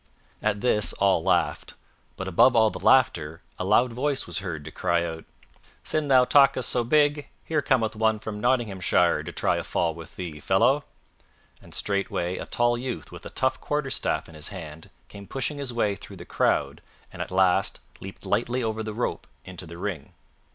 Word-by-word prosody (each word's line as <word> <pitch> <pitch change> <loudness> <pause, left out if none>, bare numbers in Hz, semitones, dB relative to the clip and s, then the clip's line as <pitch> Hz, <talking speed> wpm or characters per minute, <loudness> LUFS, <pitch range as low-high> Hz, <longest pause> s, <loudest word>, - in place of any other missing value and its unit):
At 105 -1 0
this 105 -4 +2
all 100 -1 +2
laughed; - - 0 0.4
but 95 - -5
above 95 +8 +5
all 110 -2 +5
the - - -7
laughter 85 -11 +2 0.2
a - - -1
loud 115 +5 +3
voice 135 +3 -1
was 90 +1 -3
heard 85 -6 -5
to 80 - -7
cry 85 +2 0
out, 80 -1 -6 0.6
"Sin' 155 -1 -1
thou 130 -2 +6
talkest 135 -2 +4
so 120 - +1
big, 145 +3 +2 0.2
here 155 -2 0
cometh 115 -6 +1
one 110 0 +2
from 105 -1 -6
Nottinghamshire 115 -7 +2
to - - -7
try - - 0
a - - -3
fall 85 -2 0
with 80 0 -12
thee, 85 -5 -6
fellow;" 120 - +2 0.8
and - - -10
straightway 100 -3 -1
a - - -6
tall 120 0 +1
youth 120 - -5
with - - -9
a - - -9
tough 130 0 -1
quarterstaff 145 -2 -2
in 80 - -14
his 75 -1 -8
hand 80 -5 -9 0.2
came 100 -1 -11
pushing 140 +2 -3
his 140 -3 -3
way 105 -4 0
through - - -12
the - - -10
crowd - - 0 0.3
and - - -7
at - - -4
last 95 0 +2 0.2
leaped 95 0 -10
lightly 120 +4 0
over 110 -1 -2
the 110 -1 -5
rope 120 - -3 0.2
into 90 -2 -8
the 85 +1 -9
ring. 90 -6 -5
105 Hz, 185 wpm, -26 LUFS, 90-125 Hz, 0.8 s, thou